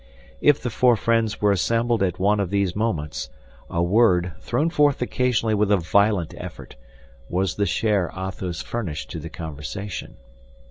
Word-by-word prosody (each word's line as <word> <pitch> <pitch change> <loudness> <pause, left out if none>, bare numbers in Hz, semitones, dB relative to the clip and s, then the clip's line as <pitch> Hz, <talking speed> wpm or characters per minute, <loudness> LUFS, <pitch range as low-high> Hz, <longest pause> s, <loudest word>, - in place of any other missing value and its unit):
If 145 -1 +5
the 125 - -4
four 125 +2 +4
friends 115 -1 0
were 105 -1 +4
assembled 115 +4 +1
at 90 -3 0
one 105 +3 +2
of 100 -3 -1
these 100 -2 0
moments, 100 -9 -2 0.4
a 85 - 0
word, 90 -2 +3
thrown 135 - 0
forth 145 -4 +3
occasionally 125 -2 +1
with 105 -1 +2
a 100 - +5
violent 100 0 +2
effort, - - -9 0.5
was 90 0 0
the 100 -1 0
share 100 -2 +1
Athos 95 -2 -4
furnished 75 - -4
to 80 - -5
the 80 +2 -7
conversation. 80 +6 -6
100 Hz, 155 wpm, -23 LUFS, 90-115 Hz, 0.5 s, If